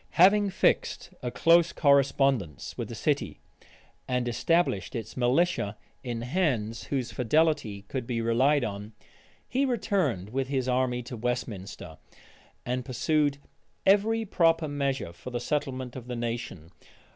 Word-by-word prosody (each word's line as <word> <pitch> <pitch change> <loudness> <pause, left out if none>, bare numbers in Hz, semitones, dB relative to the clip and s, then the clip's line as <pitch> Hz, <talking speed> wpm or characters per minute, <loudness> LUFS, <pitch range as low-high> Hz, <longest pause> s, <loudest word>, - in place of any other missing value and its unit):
Having 200 +3 +6
fixed 185 -1 0
a 125 - -2
close 170 +5 +4
correspondence 135 - +2
with - - -4
the - - -6
city, - - -1 0.7
and 125 -1 0
established 120 - +1
its 115 -1 -5
militia 125 - +1 0.3
in 120 -2 -4
hands 125 - -1
whose 130 -4 -2
fidelity 125 -5 +1
could 125 +3 -5
be 120 -2 -1
relied 125 +5 +3
on, 105 -1 -5 0.5
he 265 +3 0
returned 190 - 0
with 135 +1 -1
his 130 -2 -1
army 125 -1 0
to 125 +1 -7
Westminster, 105 - -4 0.7
and 125 +1 -2
pursued 145 +3 +1 0.5
every 220 +3 +3
proper 165 -4 +2
measure 140 - -2
for 85 - -9
the 120 -1 -3
settlement 130 -2 -3
of 125 -2 -8
the 125 - -4
nation. 115 -8 -5
130 Hz, 135 wpm, -28 LUFS, 115-155 Hz, 0.7 s, Having